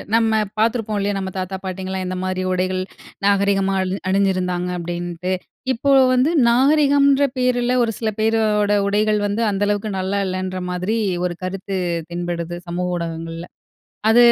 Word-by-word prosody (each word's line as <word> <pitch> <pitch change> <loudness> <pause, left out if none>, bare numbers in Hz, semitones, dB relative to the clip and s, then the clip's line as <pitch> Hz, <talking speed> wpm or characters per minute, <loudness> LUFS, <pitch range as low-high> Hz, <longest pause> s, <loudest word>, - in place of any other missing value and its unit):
நம்ம 220 -1 +3 0.2
பார்த்துருப்போம் 220 -2 +1
இல்லையா. 200 0 0
நம்ம 190 0 -4
தாத்தா, 185 +1 -3
பாட்டிங்கலாம் 190 0 -4
எந்த 185 0 -3
மாதிரி 185 0 -2
உடைகள் 185 0 0 0.4
நாகரிகமா 195 -1 +2
அழி 185 +1 -1
அணிஞ்சிருந்தாங்க 185 -2 +1
அப்படின்ட்டு. 175 +1 -3 0.4
இப்போ 280 +4 -1 0.2
வந்து 255 +5 +3 0.2
நாகரிகம்ன்ற 280 +2 +4
பேரில 250 -1 +1
ஒரு 225 - 0
சில 220 -2 0
பேரோட 215 -2 +2 0.2
உடைகள் 210 +1 +2
வந்து, 205 +3 -1
அந்த 200 +1 -1
அளவுக்கு 205 +1 -1
நல்லா 195 +2 -1
இல்லைன்ற 185 0 -3
மாதிரி 180 +5 -1 0.3
ஒரு 175 -1 -2
கருத்து 190 +1 -4 0.3
தென்படுது 175 0 -3
சமூக 180 +1 -2
ஊடகங்கள்ல, 165 0 -5 0.7
அத 235 - +5
195 Hz, 140 wpm, -20 LUFS, 185-220 Hz, 0.7 s, அத